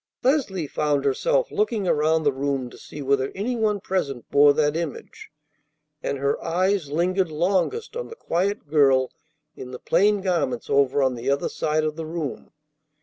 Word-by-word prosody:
Leslie 245 - +1
found 145 -1 0
herself - - +1
looking 235 - 0
around 160 0 +2
the 145 -2 +2
room 135 -2 -2
to - - -13
see 145 - -9
whether 135 0 +1
any 225 +6 -2
one 215 -3 +1
present 140 -11 -3
bore 145 0 +7
that 150 +1 +1
image, 165 -3 -6 0.7
and 140 - -2
her 140 +1 -1
eyes 185 -1 0
lingered 180 +4 +1
longest 185 - 0
on 485 - -4
the 455 - -10
quiet 195 - -2
girl 135 -4 +3 0.4
in 125 - -8
the 125 - -7
plain 205 +9 +2
garments 170 -11 -1
over 140 0 +3
on 130 -1 +2
the 125 +2 -4
other 140 0 +1
side 155 0 0
of 155 0 -2
the 165 - -4
room. 160 -4 -5
155 Hz, 170 wpm, -24 LUFS, 140-190 Hz, 0.7 s, bore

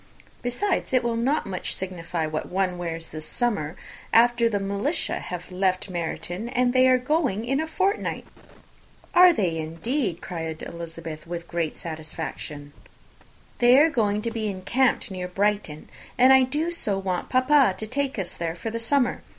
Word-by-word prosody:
Besides, 265 +8 -1
it 255 -1 +4
will 235 -1 0
not 260 +7 +1
much 185 -2 -3
signify 175 -3 -3
what 155 0 -4
one 185 -1 0
wears 165 -1 -4
this 155 0 -6
summer, 200 -10 0 0.4
after 235 0 +5
the 210 - 0 0.4
shire - - -2
have 180 +1 -7
left 185 +1 0
Meryton, 175 +5 -4
and 245 -1 +1
they 255 0 +5
are 255 0 +6
going 255 - 0
in 270 +3 0
a 320 - -1
fortnight." 390 +5 -1 0.9
"Are 360 +1 +8
they, 180 - 0
indeed?" 165 - -2
cried 160 -3 -5
Elizabeth, 165 -1 -7
with 170 0 -4
the - - -27
greatest 170 -3 -3
satisfaction. 155 -2 -6 0.9
"They 245 +1 +7
are 315 +3 +6
going 210 -5 +1
to 230 - -2
be 225 -2 -2
encamped 210 +5 0
near 180 -1 -4
Brighton; 195 -4 -1 0.3
and 260 +1 +7
I 265 -1 +6
do 300 +6 -1
so 210 - 0
want 185 -2 -2
papa 255 -4 +4
to 220 - -4
take 270 +3 -2
us 190 -3 -3
all 170 - 0
there 165 - -3
for 225 +6 -5
the 230 - -3
summer! 245 +2 +1
205 Hz, 170 wpm, -25 LUFS, 170-255 Hz, 0.9 s, Are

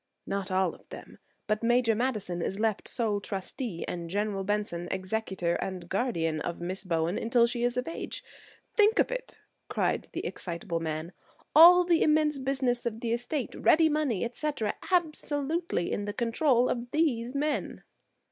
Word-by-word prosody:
"Not 200 0 -3
all 185 -2 +1
of - - -18
them; - - -11 0.3
but 215 0 0
Major 240 0 +3
Madison 215 -7 -2
is 195 +3 -3
left 220 -2 0
sole 215 -4 -1
trustee, 195 0 -4
and 170 -1 -4
General 200 +1 -1
Benson 200 -4 -2
executor 190 -2 -2
and 185 -2 -5
guardian 170 -7 -1
of 175 - -4
Miss 185 +3 -4
Bowen 170 -1 0
until 235 +1 +3
she 235 0 -2
is 245 0 +1
of 250 - -1
age. 330 - -4 0.5
Think 430 +2 +4
of - - +3
it!" - - -5 0.3
cried - - -1
the - - -4
excitable 170 0 -4
man, 160 +1 -4 0.4
"all 350 +3 +10
the 345 -2 +3
immense 305 -2 +3
business 260 -3 0
of 225 -1 -4
the 230 -1 -1
estate, 245 +3 -2
ready 320 0 +4
money, 295 -10 0
etc., 245 -3 -2 0.2
absolutely 315 - 0
in 205 - -2
the 205 - -3
control 245 +2 +2
of 245 0 -2
these 255 -5 0
men!" 295 +1 -2
230 Hz, 160 wpm, -29 LUFS, 190-275 Hz, 0.5 s, all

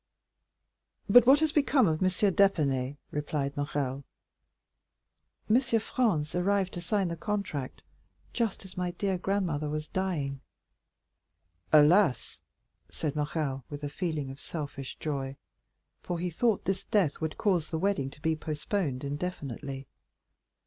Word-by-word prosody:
"But 245 +4 +7
what 280 +3 +7
has 315 -1 +3
become 280 -5 +4
of 155 -1 0
M. 185 - +4
d'Épinay?" 160 -9 +2
replied 145 -1 -2
Morrel. 140 -2 -2 1.4
30349m 240 +2 +2
"M. - - +5
Franz 200 -10 0
arrived 190 +1 +1
to 175 - -4
sign 195 +1 0
the 170 - -3
contract 170 - -3 0.5
just 225 -5 -1
as 190 - -12
my 180 -1 -1
dear 185 +1 -1
grandmother 175 -6 -1
was 155 0 -3
dying." 150 -8 -2 1.3
"Alas," 155 0 +4 0.5
said 155 -2 -3
Morrel 145 -3 -2
with 145 0 -7
a 145 - -2
feeling 150 -3 -3
of 135 - -10
selfish 145 -4 -6
joy; 135 -3 -3 0.7
for 175 - -3
he 175 +1 -2
thought 220 +4 +1
this 195 0 -1
death 180 -10 +1
would 160 -1 -2
cause 180 -7 +1
the 160 - -2
wedding 160 -7 0
to 145 - -14
be 160 0 +2
postponed 155 -2 -2
indefinitely. 140 -3 -4
160 Hz, 135 wpm, -29 LUFS, 145-195 Hz, 1.4 s, But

